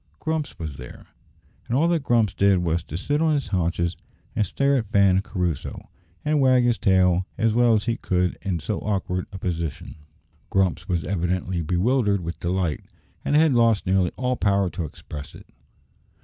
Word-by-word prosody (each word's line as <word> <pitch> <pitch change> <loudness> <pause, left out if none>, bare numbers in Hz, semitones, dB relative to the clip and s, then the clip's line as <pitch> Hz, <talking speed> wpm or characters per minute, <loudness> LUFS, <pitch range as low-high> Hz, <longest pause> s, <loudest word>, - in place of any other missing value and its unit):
Grumps 160 -2 -3
was 75 -5 -6
there, 60 0 -11 0.6
and 120 - 0
all 160 +4 +3
that 170 -2 +1
Grumps 115 -7 +2
did 100 -1 +3
was 85 -1 0
to 80 - -5
sit 145 - -1
on 160 -2 +3
his 140 - -2
haunches 85 -1 0 0.4
and - - +2
stare 140 0 +1
at 115 -4 -2
Fan 100 -2 +4
and 95 - 0
Crusoe, 90 -8 -4 0.3
and 150 -1 +2
wag 130 -2 +5
his 120 -2 +1
tail 95 -2 +3
as 115 -1 +2
well 120 -1 +4
as 105 - 0
he 115 -1 -1
could 90 -4 0
in 95 -4 -1
so 95 +7 -3
awkward 95 -3 -2
a 95 - -7
position! 85 -7 -4 0.5
Grumps 95 0 0
was 85 -3 0
evidently 90 -1 -1
bewildered 100 - +1
with 85 0 -5
delight, 85 -3 -1 0.4
and 145 - 0
had 155 -2 +5
lost 115 -3 +3
nearly 95 -1 +2
all 125 0 0
power 100 -2 +1
to 85 - -4
express 75 -1 -9
it. - - -13
95 Hz, 180 wpm, -24 LUFS, 90-120 Hz, 0.6 s, wag